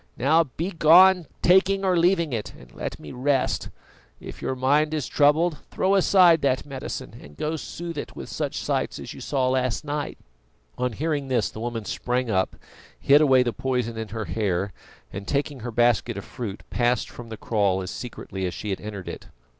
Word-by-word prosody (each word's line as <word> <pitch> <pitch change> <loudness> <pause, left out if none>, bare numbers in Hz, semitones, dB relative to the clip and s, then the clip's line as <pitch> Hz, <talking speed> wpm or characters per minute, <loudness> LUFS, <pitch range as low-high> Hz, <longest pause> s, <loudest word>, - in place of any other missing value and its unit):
Now 155 +6 +4
begone, 170 +3 +5 0.2
taking 190 +2 +4
or 185 -1 +3
leaving 170 -3 +2
it, 110 -3 -4
and - - -16
let - - -5
me 75 - -9
rest. 135 +1 0 0.5
If - - -10
your 130 - -2
mind 145 +4 +2
is 150 -4 -2
troubled, 150 +4 +3
throw 190 +1 +1
aside 185 -4 +5
that 130 -1 +1
medicine, 135 -2 -6
and 75 0 -14
go 155 +1 -2
soothe 165 0 -6
it - - -7
with - - -7
such - - -3
sights - - -1
as - - -7
you - - -11
saw 130 -2 0
last 130 +1 0
night." 145 0 -3 0.6
On 125 -1 -1
hearing 150 +1 -2
this 125 -4 0
the - - -9
woman 115 -1 -4
sprang 125 +1 -1
up, 95 -1 0 0.4
hid 145 +2 +5
away 130 -4 +5
the 120 -2 -2
poison 125 -3 -2
in 110 0 -4
her 110 0 -5
hair, 95 0 -1 0.4
and 100 0 -6
taking 145 -1 -1
her 120 +1 -5
basket 120 -1 +2
of 100 - -6
fruit, 110 -5 -6
passed 120 0 +1
from 120 -1 -10
the 110 - -7
kraal 100 -4 0
as 90 - -6
secretly 95 -6 -5
as 90 - -5
she 105 - -4
had 95 - -3
entered 105 -3 -7
it. - - -7
130 Hz, 190 wpm, -25 LUFS, 110-155 Hz, 0.6 s, begone